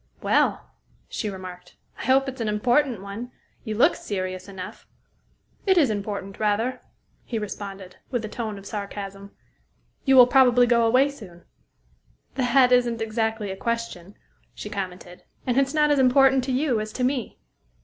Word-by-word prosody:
"Well," - - +1 0.4
she 215 - -3
remarked, 180 -2 -9 0.2
"I - - -5
hope 265 +2 +3
it's 265 -2 -5
an 225 - -1
important 240 +1 +1
one. 215 +5 -7 0.3
You 220 -3 -4
look 290 +9 +5
serious 185 -2 -4
enough." 190 -2 -9 0.8
"It 380 -1 +4
is 285 -9 +4
important, 200 -1 -5
rather," 220 +4 0 0.4
he 235 - -4
responded, 195 -3 -7
with 245 -4 -2
a - - -4
tone 215 -2 -5
of 195 - -12
sarcasm. 200 -1 -6 0.7
"You 270 -1 +4
will 250 -1 +10
probably 250 -1 +5
go 235 -1 +3
away 255 +4 +4
soon?" 185 -11 -13 0.9
"That 250 0 +3
isn't 240 -2 +3
exactly 220 -2 -2
a - - -5
question," 230 -4 -4 0.4
she 210 - -7
commented, 185 -3 -6 0.2
"and 255 +1 +2
it's 270 0 +1
not 300 -1 +3
as 290 - +3
important 265 0 +5
to 265 - -2
you 255 -3 +1
as 215 0 -4
to 255 - -3
me." 255 -3 -1
225 Hz, 160 wpm, -24 LUFS, 200-255 Hz, 0.9 s, will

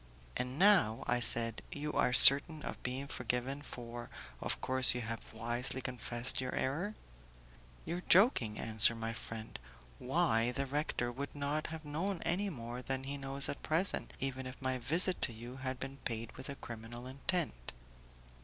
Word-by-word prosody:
"And 125 +2 -4
now," 180 - +4
I 120 0 0
said, 115 -1 0
"you 150 +1 -5
are - - +1
certain 145 +4 +11
of - - -7
being 130 +2 -4
forgiven, 125 +2 -4
for, 120 -3 -8 0.3
of - - -3
course, 130 -1 +4
you 125 - -3
have 115 0 -6
wisely 120 +3 -2
confessed 125 -1 -3
your 130 - -4
error?" 175 +11 -2 0.9
"You 170 - -4
are 180 - -8
joking," 170 - +4
answered 110 +1 +3
my 115 0 -4
friend; 110 - -8 0.4
"why, 130 -5 +1
the 140 - 0
good 135 - -10
rector 145 -4 -2
would 140 +4 -7
not 145 +2 -3
have 160 -1 -8
known 170 +6 -3
any 195 +4 -1
more 120 -5 -7
than 130 +1 -4
he 140 +1 -5
knows 140 0 0
at 140 - -6
present, 170 +5 -1
even 130 -1 -4
if 130 - -10
my 130 -2 -2
visit 170 +8 0
to 120 - 0
you 120 +3 -10
had 130 -1 -5
been 135 0 -7
paid 115 -3 -5
with 130 +2 -10
a 140 - -6
criminal 120 0 -9
intent." 135 - -4
130 Hz, 175 wpm, -33 LUFS, 120-145 Hz, 0.9 s, certain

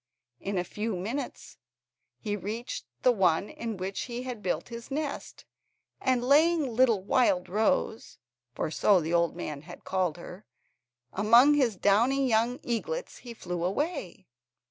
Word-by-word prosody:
In 195 0 -3
a 180 - +1
few 210 +3 -3
minutes 225 +11 -5 0.6
he 205 -2 -3
reached 215 +5 -5 0.2
the 250 - +6
one 190 -3 +2
in 225 -3 -5
which 190 +1 -4
he 240 +1 -4
had 250 -4 -6
built 175 -1 -2
his 235 0 -8
nest, 290 0 -5 0.5
and 255 -2 +1
laying 295 -2 +3
little 230 -6 +3
Wildrose 220 +2 +1 0.4
(for 155 - -2
so 195 +3 +4
the 165 0 -3
old 170 -1 +2
man 150 -5 -5
had 175 +3 -12
called 185 -4 -1
her) 180 +3 -10 0.7
among 235 +8 +6
his 255 -7 +2
downy 240 +9 +3
young 235 +2 +1
eaglets, 475 - -3
he 240 -2 -10
flew 175 -5 -4
away. 200 - -3
220 Hz, 145 wpm, -28 LUFS, 185-255 Hz, 0.7 s, the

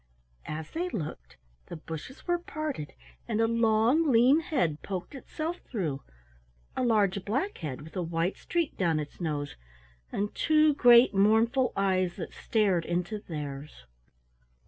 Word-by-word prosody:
As 155 0 -5
they 350 +3 -2
looked 150 - -6 0.3
the - - -7
bushes 160 - -8
were 350 -1 +1
parted, 310 - -5 0.3
and 210 - -1
a 225 - +4
long 230 +7 +3
lean 250 +6 +6
head 250 - -1
poked 190 +6 -5
itself 315 +5 -5
through, 160 - -4 0.7
a - - 0
large 205 -5 +2
black 270 - -2
head 150 -3 -5
with 160 - -13
a 185 - -1
white 170 +2 -1
streak 340 -3 -2
down 165 -4 +1
its 150 +4 -7
nose, 145 -3 -3 0.6
and 205 +1 -2
two 310 -1 +4
great 240 -4 +7
mournful 225 +6 +3
eyes 185 -2 +1
that - - -7
stared 200 -6 +1
into 180 +6 -2
theirs. 145 - -7
205 Hz, 145 wpm, -29 LUFS, 165-260 Hz, 0.7 s, great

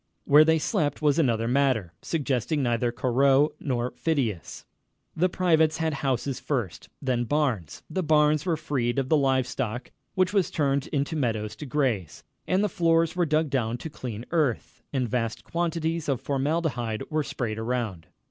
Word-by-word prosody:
Where 150 +2 +7
they 160 +1 +4
slept 150 -1 -1
was 150 +1 +3
another 115 -6 +2
matter, 125 -9 +1
suggesting 140 -2 -1
neither 120 0 +1
Corot 135 +4 +3
nor 125 -3 -2
Phidias. 130 - -2 0.5
The 180 +3 +2
privates 160 -4 +2
had 160 -1 0
houses 135 -1 -1
first, 120 - -3
then 125 -2 +1
barns. 125 - -1
The 185 +4 -2
barns 150 -2 +3
were 170 -3 0
freed 140 -6 -1
of 135 -1 0
the 160 - +5
live 135 -2 +2
stock, 120 -1 -4 0.2
which 185 +1 +2
was 195 -4 +2
turned 140 -2 0
into 145 +2 -1
meadows 110 -7 -1
to 150 - -7
graze, 125 - -1 0.2
and 185 +3 +2
the - - +3
floors 165 -2 +2
were 175 -2 +1
dug 155 -1 +1
down 120 -3 0
to 160 +5 -7
clean 120 -4 -6
earth, 150 -8 -1
and 130 -3 0
vast 115 -2 -2
quantities 165 -2 -2
of 135 -4 +1
formaldehyde 135 -6 -1
were 155 0 +1
sprayed 110 -6 -3
around. 110 -8 -3
140 Hz, 165 wpm, -26 LUFS, 120-155 Hz, 0.5 s, Where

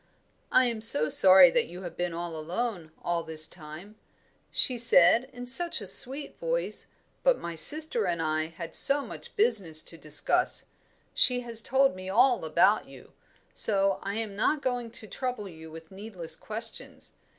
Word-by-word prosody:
'I 255 - +3
am 230 -3 -4
so 155 -9 +5
sorry 185 -2 +6
that - - -1
you 180 +3 -12
have 175 -2 -10
been 175 0 -4
alone 170 +3 -6
all 170 -1 -3
this 155 -1 +2
time,' 170 +6 -13 0.5
she 255 - +1
said, 230 +1 +3
in 245 0 -10
such 340 +8 +5
a 205 - -8
sweet 270 +9 +2
voice, - - -5 0.3
'but - - +1
my 170 - -8
sister 235 - +1
and 170 -1 -3
I 155 0 -3
had 165 0 -11
so 280 0 +4
much - - -12
business 185 - +1
to 165 - -15
discuss. 155 - 0 0.5
She 250 -1 +1
has 230 -2 -5
told 270 -2 0
me 185 0 -10
all 245 +3 +1
about 170 +7 0
you, - - -17 0.4
so 195 -2 +2
I 200 +1 -6
am 220 -3 -6
not 285 +8 -2
going 245 -2 -4
to 225 - -2
trouble 250 0 -7
you 160 -3 -14
with 160 +1 -14
needless 190 -4 -8
questions. 220 +2 -6
200 Hz, 165 wpm, -26 LUFS, 170-245 Hz, 0.5 s, sorry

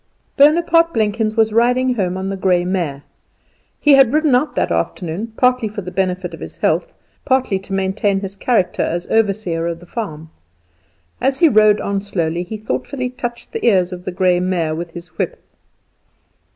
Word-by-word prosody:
Bonaparte 330 +2 +4
Blenkins 215 0 0
was 220 -1 +3
riding 250 +3 +3
home 185 -5 -1
on 190 +1 -3
the 195 - -3
grey 180 -2 +1
mare. 170 -7 -2 0.8
He 295 - +4
had 270 -4 +6
ridden 305 -2 +2
out 255 +5 +1
that - - 0
afternoon, 185 +6 -3
partly 250 -2 +2
for 205 0 -6
the 180 - -7
benefit 180 -1 -2
of 165 - -9
his - - -9
health, - - 0 0.3
partly 260 -7 +1
to 195 - -13
maintain 195 +1 0
his 195 0 -6
character 205 -3 0
as 175 +1 -2
overseer 195 -6 0
of 170 -1 -4
the 175 - -14
farm. 160 -6 -6 0.9
As 270 0 +1
he 340 - +5
rode 215 -4 +5
on 200 0 -2
slowly, 170 -4 -2
he 195 +5 -6
thoughtfully 250 +4 -3
touched 240 -1 -6
the - - -5
ears 185 -6 +3
of 180 0 -9
the - - -3
grey 180 0 +2
mare 180 -3 -1
with 170 +2 -5
his 175 +1 -9
whip. - - -2
200 Hz, 180 wpm, -18 LUFS, 180-240 Hz, 0.9 s, had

